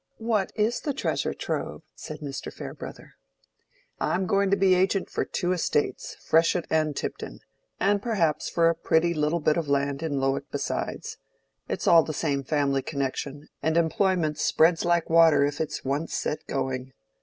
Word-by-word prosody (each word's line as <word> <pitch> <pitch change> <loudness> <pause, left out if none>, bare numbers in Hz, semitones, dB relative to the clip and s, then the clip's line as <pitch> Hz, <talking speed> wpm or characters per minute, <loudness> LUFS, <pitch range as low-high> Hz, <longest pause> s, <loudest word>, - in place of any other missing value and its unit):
"What 225 -4 0
is 220 +2 +1
the 290 -3 -2
treasure - - -1
trove?" - - -4
said 155 -1 -9
Mr. 140 -2 -5
Farebrother. - - -9 0.9
"I'm 190 - 0
going 200 +1 +2
to 200 - +3
be 190 -1 +4
agent 190 +1 +1
for - - 0
two 175 - -2
estates, 170 -4 -1
Freshitt 165 +1 +2
and 155 -2 +1
Tipton; - - -5 0.4
and 200 0 +2
perhaps 170 -10 0
for 170 -1 +3
a 165 - +4
pretty 165 +1 +1
little 155 +2 0
bit 155 +1 +2
of 165 -3 -1
land 140 0 0
in 150 -4 -1
Lowick 135 0 -1
besides: - - -3 0.5
it's - - -3
all 165 -1 +7
the 155 -1 -5
same 140 -4 -1
family 140 -1 +1
connection, 140 +1 -4
and 160 +1 +1
employment 170 -2 +1
spreads 165 +1 +3
like 175 -1 +2
water 160 -3 +5
if 145 +1 -2
it's 155 - -4
once 145 +5 -2
set 150 - -3
going. 130 -1 -3
160 Hz, 165 wpm, -26 LUFS, 145-180 Hz, 0.9 s, all